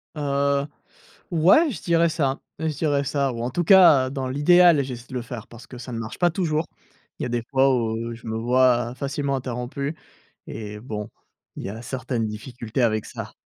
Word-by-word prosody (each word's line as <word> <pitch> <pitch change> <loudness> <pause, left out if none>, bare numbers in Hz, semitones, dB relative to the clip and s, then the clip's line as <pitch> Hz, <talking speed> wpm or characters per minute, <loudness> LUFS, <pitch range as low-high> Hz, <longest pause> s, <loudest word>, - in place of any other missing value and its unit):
Heu, 140 -1 0 0.6
ouais, 190 - +5
je 185 - -7
dirais 170 0 +3
ça. 140 -4 0 0.2
Je 160 - -2
dirais 145 -1 0
ça 140 -1 0
ou, 115 -1 -5
en 120 - -2
tout 175 +6 -1
cas, 155 -9 +7
dans 135 -2 -3
l'idéal, 165 +3 +5
j'essaie 125 -2 -7
de 130 - -10
le 125 - -2
faire 115 -2 -8
parce 120 +1 -13
que 125 - -11
ça 125 0 -8
ne 115 - -4
marche 110 -1 -6
pas 175 -1 +3
toujours. 160 -3 -1 0.5
Il - - -5
y - - -1
a - - -3
des 120 -1 -1
fois 135 -1 +4
où 115 0 -2
je 115 - -13
me 110 0 -3
vois 120 0 +2
facilement 140 +1 -2
interrompu 130 +3 -4 0.5
et 105 -1 -7
bon, 105 -3 -5 0.5
il - - -6
y - - -4
a 110 +2 -8
certaines 125 -2 -3
difficultés 115 +2 -4
avec 110 -2 +1
ça. - - -8
130 Hz, 200 wpm, -24 LUFS, 120-145 Hz, 0.6 s, cas